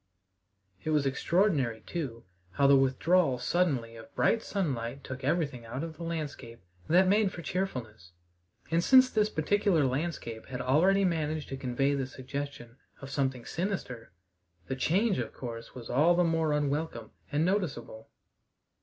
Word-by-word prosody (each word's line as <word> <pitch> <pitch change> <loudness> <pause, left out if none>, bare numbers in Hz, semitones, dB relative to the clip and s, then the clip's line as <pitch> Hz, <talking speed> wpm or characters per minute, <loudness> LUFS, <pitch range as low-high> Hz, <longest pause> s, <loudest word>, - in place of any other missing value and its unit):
It - - -3
was 150 -2 +2
extraordinary, 135 - +1
too, 130 -9 -5 0.3
how 140 - +2
the 140 0 +7
withdrawal 135 +2 +3
suddenly 130 -7 0
of 115 +5 -13
bright 230 - +2
sunlight 135 - -3
took 130 +1 -7
everything 140 -4 0
out 120 +6 -5
of 165 -1 -6
the 170 - -7
landscape 145 -8 -5 0.3
that 185 +3 +5
made 200 0 +3
for 170 - -8
cheerfulness; 120 - -4 0.6
and 165 +1 +2
since 260 +2 +6
this 215 -1 +2
particular 180 -2 +2
landscape 130 -5 -3
had 125 -1 -5
already 175 +10 +3
managed 155 -3 -1
to 135 - -4
convey 135 +1 0
the 135 -2 -1
suggestion 130 -2 -7 0.2
of 135 -1 -9
something 130 -3 -1
sinister, 165 - -4 0.5
the 130 - -3
change 190 - +1
of 115 -3 -4
course 115 -1 -7
was 120 -2 -8
all 160 +7 +4
the 180 - +3
more 165 -2 +1
unwelcome 145 -5 -2 0.2
and 150 +2 +2
noticeable. 180 - -2
145 Hz, 150 wpm, -30 LUFS, 125-175 Hz, 0.6 s, the